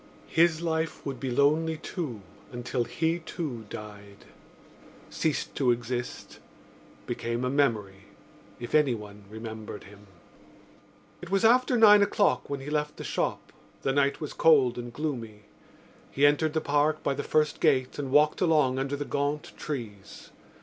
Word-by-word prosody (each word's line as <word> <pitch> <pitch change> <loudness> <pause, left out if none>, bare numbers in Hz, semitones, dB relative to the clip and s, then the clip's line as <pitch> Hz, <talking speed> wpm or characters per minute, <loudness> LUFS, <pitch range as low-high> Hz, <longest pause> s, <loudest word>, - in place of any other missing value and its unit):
His 165 -1 +4
life 160 -1 -2
would 135 -3 -4
be 135 - -3
lonely 155 +5 +2
too 145 - -5 0.3
until 120 0 -2
he, 165 +5 -1
too, 140 - -6
died, 100 -1 -10 0.9
ceased 155 -2 -1
to 130 -3 +2
exist, 120 +1 -3 0.7
became 120 +2 -3
a 125 - 0
memory—if 110 -3 -3
anyone 105 -9 0
remembered 110 -1 -8
him. 100 +1 -15 1.1
It 175 - -9
was 195 +2 +2
after 250 +2 +4
nine 210 -2 +8
o'clock 200 0 +2
when 140 -1 -3
he 140 - -7
left 150 0 -1
the - - -7
shop. - - -3 0.3
The 135 - +1
night 140 0 +2
was 150 - -5
cold 135 -7 +4
and 120 0 -6
gloomy. 115 -7 -5 0.7
He 140 - +2
entered 150 +1 +3
the 160 - 0
Park 145 +2 +1
by 140 - +1
the 145 - -3
first 150 0 +1
gate 135 -4 +2
and 140 -2 -3
walked 150 +2 +3
along 150 -7 +3
under 135 +1 -2
the 145 0 -4
gaunt 145 +1 -2
trees. 105 -9 -7
140 Hz, 145 wpm, -28 LUFS, 120-155 Hz, 1.1 s, nine